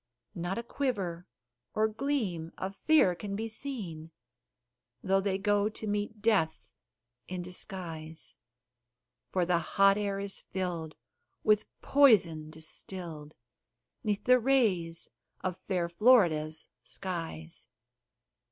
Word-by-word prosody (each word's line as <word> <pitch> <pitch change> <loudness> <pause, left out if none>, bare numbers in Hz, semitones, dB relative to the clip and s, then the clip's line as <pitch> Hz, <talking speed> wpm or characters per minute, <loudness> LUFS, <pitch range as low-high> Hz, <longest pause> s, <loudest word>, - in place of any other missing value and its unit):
Not 175 +2 -3
a 235 - -2
quiver 195 -10 -2 0.5
or 215 0 +4
gleam 215 - -2
of 190 +1 -4
fear 300 -13 +6
can 200 +3 -5
be 220 +2 -2
seen, 210 - -6 0.9
Though 195 0 +3
they 195 -1 0
go 205 +1 +2
to 220 - -8
meet 210 0 -2
death 205 -8 +2 0.6
in 180 -1 -4
disguise; 165 -4 -6 0.9
For 180 -2 +1
the 175 -1 +3
hot 195 +4 +4
air 200 -1 -1
is 200 0 -3
filled 175 -4 -4 0.5
with 215 0 +4 0.2
poison 180 - +5
distilled 160 -1 -7 0.7
'Neath 210 -3 0
the 250 0 +6
rays 205 -11 +1 0.3
of 185 -1 -3
fair 180 -3 +1
Florida's 170 -6 +4 0.2
skies. 165 -5 -5
190 Hz, 110 wpm, -31 LUFS, 170-215 Hz, 0.9 s, fear